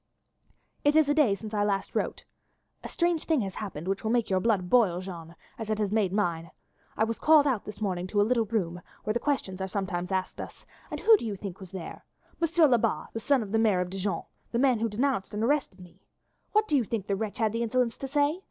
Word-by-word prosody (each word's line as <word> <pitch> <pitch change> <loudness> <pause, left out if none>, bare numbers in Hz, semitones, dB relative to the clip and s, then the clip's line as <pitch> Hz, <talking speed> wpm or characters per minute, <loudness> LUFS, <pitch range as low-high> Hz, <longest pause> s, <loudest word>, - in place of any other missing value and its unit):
"It 290 +1 +3
is 315 -2 +5
a - - +4
day 285 -10 +4
since 215 +1 -9
I 205 -1 +1 0.3
wrote - - -30
last. - - -2 0.6
A - - -4
strange 340 -2 0
thing 315 -6 +2
has 195 -2 -4
happened 185 -6 -6
which 195 +1 -1
will 220 - -1
make 230 -3 +1
your 190 - +3
blood 200 -3 +1
boil, 185 -5 +4
Jeanne, 170 -3 -8 0.2
as 220 -1 -5
it 215 - 0
has 210 -2 -1
made 210 -4 +2
mine. 170 -5 -1 0.5
I - - +3
was 230 +1 -2
called 305 -2 +6
out 255 -7 0
this 210 0 -9
morning 185 -3 -1
to 205 +2 0
a - - +6
little 235 0 +2
room 180 -6 -2 0.2
where 215 - 0
questions 235 -7 -1
are 190 - -1
sometimes 190 -2 -3
asked 190 -1 -2
us, - - -10 0.2
and - - -5
who 445 0 +7
do - - -8
you 210 -3 -3
think 190 -2 -7
was 190 -2 -10
there? 185 -2 -8 0.4
M. 335 - +3 0.2
Lebat, 240 -2 +1
the 225 - -3
son 265 +1 +2
of 200 - -8
the 225 - +2
Maire 210 -5 +3
of 180 0 -4
Dijon 195 +1 -2 0.3
the 235 - 0
man 255 -2 +3
who 230 +1 0
denounced 220 -2 -1
and 210 - -1
arrested 270 -7 0
me. 180 -1 -15 0.5
What 425 +1 +3
do 300 - +1
you 265 - +3
think 220 -2 -3
the 200 - 0
wretch 215 +2 -4
had 220 -3 +1
the 230 - -1
insolence 235 0 +1
to 270 - -4
say? 290 +4 +1
215 Hz, 245 wpm, -28 LUFS, 190-250 Hz, 0.6 s, who